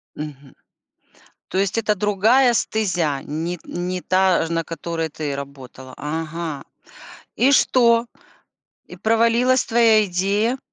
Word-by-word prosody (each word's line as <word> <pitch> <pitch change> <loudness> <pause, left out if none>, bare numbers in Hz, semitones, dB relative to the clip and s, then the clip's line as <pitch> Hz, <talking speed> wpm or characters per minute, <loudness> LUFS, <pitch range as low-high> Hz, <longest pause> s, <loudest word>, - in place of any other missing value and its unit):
Мгм. 145 -3 -9 0.9
То 185 - -3
есть 195 +3 0
это 210 -1 +1
другая 220 +6 +3
стезя, 175 -12 -1
не 165 +4 -4
не 180 +1 -4
та, 185 -2 +2
ж - - -7
на 165 0 0
которой 165 0 -4
ты 145 -2 -4
работала. 135 -2 -10
Ага. 160 0 -5 0.7
И 260 +5 +3
что? 235 -3 +4 0.8
И 180 - -12
провалилась 230 +5 +2
твоя 225 -2 +4
идея? 200 +7 0
185 Hz, 120 wpm, -21 LUFS, 160-225 Hz, 0.9 s, что